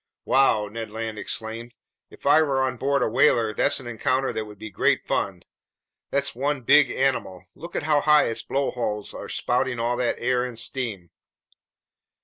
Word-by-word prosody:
"Wow!" 125 -5 +3
Ned 115 +1 -6
Land 110 0 -5
exclaimed. 115 +1 -5 0.3
"If - - -17
I 150 +3 +6
were 140 -4 +1
on 130 -1 0
board 140 +1 +1
a - - +1
whaler, 115 -2 +3
there's - - +2
an 130 - -11
encounter 130 +3 -1
that 110 - -3
would 105 -1 -12
be 110 +1 -8
great - - +1
fun! - - -2 0.7
That's 140 0 +1
one 140 +2 -1
big 140 +2 +5
animal! 125 -9 -1
Look 170 +2 -7
how 150 -1 +2
high 150 0 +5
its 115 - -2
blowholes 120 -6 -2
are - - -8
spouting 125 0 -1
all 120 +1 0
that 125 -1 0
air 125 0 0
and 125 -2 -6
steam! 110 -7 -4
125 Hz, 170 wpm, -24 LUFS, 110-135 Hz, 0.7 s, I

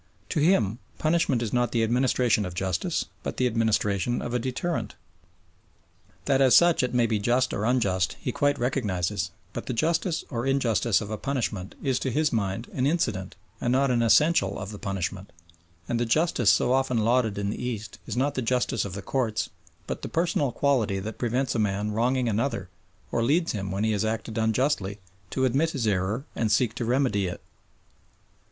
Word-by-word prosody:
To - - 0
him 125 - +2 0.2
punishment 155 -6 +1
is 110 - -4
not 120 -1 +1
the 115 -2 +2
administration 120 -2 +2
of 90 -2 -5
justice 95 -2 -1 0.2
but - - -5
the 130 - +2
administration 110 -1 +1
of 120 - -4
a 125 - +1
deterrent. 130 +8 -3 1.3
That 135 -1 +3
as 130 -2 +6
such 175 -1 +5
it 125 -1 -1
may 120 -1 +4
be 110 -2 0
just 125 +5 +1
or 105 - -1
unjust 100 -7 +1
he 125 - -3
quite 145 +3 +1
recognises, 100 -7 -1 0.2
but - - -6
the - - -1
justice 165 - 0
or 120 0 -2
injustice 120 -5 +2
of 105 0 -6
a 110 - -3
punishment 110 -8 -3
is 130 -2 +1
to 130 - -2
his 150 +3 +1
mind 105 +1 -1
an 130 0 +1
incident 110 - -1 0.3
and 120 - +1
not 135 +1 +3
an 120 -1 +2
essential 115 - +4
of 100 0 -6
the 105 - -8
punishment, 95 -1 -4 0.6
and 120 -1 -1
the 120 - +1
justice 125 -4 +2
so 125 - +4
often 130 -2 +1
lauded 115 -1 +2
in 100 0 -1
the - - -5
East 115 -4 -5
is - - -4
not 140 +2 +1
the 130 - -2
justice 125 -1 0
of 95 - -6
the 100 0 -6
courts 115 -5 -1 0.3
but - - -5
the - - -5
personal 165 -5 +1
quality 120 -8 +1
that 105 +3 -6
prevents 125 +2 0
a - - -1
man 105 0 0
wronging 125 +3 +1
another 110 -4 -1 0.4
or 115 - 0
leads 155 +8 +2
him 95 -3 -4
when 95 +3 -2
he 110 - +2
has 105 -1 0
acted 110 0 -3
unjustly 110 -2 0 0.3
to 130 +4 0
admit 135 +6 +2
his 135 -7 -2
error 105 +5 0
and 110 -2 0
seek 110 +1 +2
to 120 +1 -3
remedy 120 -6 +1
it. 90 - -6
120 Hz, 190 wpm, -26 LUFS, 105-130 Hz, 1.3 s, as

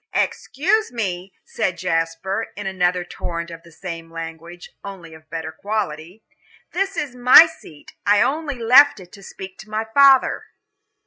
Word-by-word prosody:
"Excuse 385 +10 0
me," 190 -5 -4
said 185 -2 -2
Jasper, 165 +6 -2
in 205 - -7
another 180 -2 0
torrent 170 -1 -6
of 165 0 -10
the 170 - -18
same 165 -1 -8
language, 165 +1 -9
only 185 -5 -10
of 160 - -13
a - - -36
better 160 0 -6
quality, 195 -1 -5 0.5
"this 390 0 -2
is 285 -6 -3
my 250 +6 +8
seat 320 - -14
I 205 0 +4
only 295 0 -2
left 250 +3 +6
it 180 -1 -14
to 200 - -14
speak 190 -1 -10
to 215 - -12
my 215 +1 -2
father." 275 -2 +5
190 Hz, 155 wpm, -21 LUFS, 165-245 Hz, 0.5 s, my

